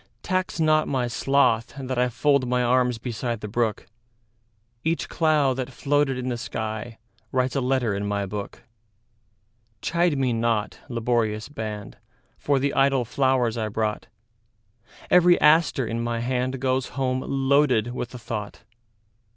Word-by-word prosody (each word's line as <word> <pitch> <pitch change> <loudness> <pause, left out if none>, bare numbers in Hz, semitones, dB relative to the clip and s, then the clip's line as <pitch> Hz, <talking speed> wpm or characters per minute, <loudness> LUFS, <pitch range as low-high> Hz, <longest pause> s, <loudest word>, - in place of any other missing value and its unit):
Tax 185 -2 -1
not 155 -1 +3
my 130 -3 0
sloth 120 -2 +1
that 130 -2 -3
IFold 125 +2 +2
my 125 0 +1
arms 125 0 +2
beside 120 -1 -4
the 105 - -5
brook; 110 0 -1 1.0
Each 165 +1 -1
cloud 150 -5 +2
that 130 -1 -3
floated 140 0 +1
in 125 0 -4
the 120 - -2
skyWrites 115 +3 -4
a - - +2
letter 130 -4 +1
in 100 +1 -2
my 100 -1 -1
book. 100 +4 -7 1.2
Chide 170 -3 +1
me 130 -3 +1
not, 115 -2 -1
laborious 115 -2 -1
band, 110 -6 -6 0.4
For 140 -1 +1
the 140 +1 0
idle 135 -2 +3
flowers 125 -2 +1
I 110 - -1
brought; 105 0 -2 1.0
Every 180 0 +6
aster 150 -4 +4
in 115 +1 -3
my 120 0 -2
handGoes 130 +1 -1
home 130 -1 0
loaded 135 -4 +2
with 125 0 -5
a - - -5
thought. 105 -3 -6
125 Hz, 135 wpm, -24 LUFS, 115-135 Hz, 1.2 s, Every